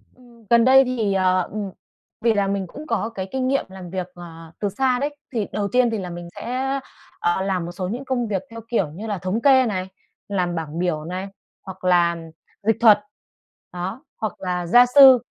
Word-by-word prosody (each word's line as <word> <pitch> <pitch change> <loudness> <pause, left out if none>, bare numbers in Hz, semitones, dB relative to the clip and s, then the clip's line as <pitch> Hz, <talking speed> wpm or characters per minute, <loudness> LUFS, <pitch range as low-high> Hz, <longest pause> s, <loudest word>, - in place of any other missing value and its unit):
Ừm, 240 -3 -20
gần 235 -1 +5
đây 265 +1 +7
thì, 230 -6 0
ờ, 185 -1 +3
ừm, 205 -1 -4 0.5
vì 230 -1 +3
là 200 -2 +1
mình 195 -1 -2
cũng 300 - -10
có 220 - -1
cái 195 -4 -5
kinh 260 -1 -1
nghiệm 275 +1 +1
làm 190 -2 -9
việc, 185 0 -3
ờ, 165 -2 -11
từ 205 - 0
xa 250 +4 +1
đấy, 290 +2 -2 0.2
thì 220 -4 -1
đầu 205 -1 -1
tiên 250 -1 +4
thì 225 - -2
là 185 -2 -5
mình 175 0 -7
sẽ, 265 +3 -2 0.4
ờ, 175 +2 +1
làm 190 -3 -1
một 175 - -6
số 180 +1 -4
những 245 +8 -5
công 250 -3 -1
việc 195 -3 -2
theo 230 0 -9
kiểu 200 -9 +1
như 200 +8 -7
là 205 -2 -2
thống 185 +5 -2
kê 265 -1 +6
này, 190 -5 -2 0.4
làm 180 -3 -1
bảng 160 0 -4
biểu 165 -4 -1
này, 185 +3 -4 0.3
hoặc 190 0 -10
làm 170 -2 +2 0.3
dịch 225 0 +2
thuật. 220 -3 +7 0.7
Đó, 185 +7 -5
hoặc 215 -2 -3
là 180 -2 -2
gia 245 +7 +7
sư. 265 0 +8
200 Hz, 210 wpm, -22 LUFS, 180-240 Hz, 0.7 s, sư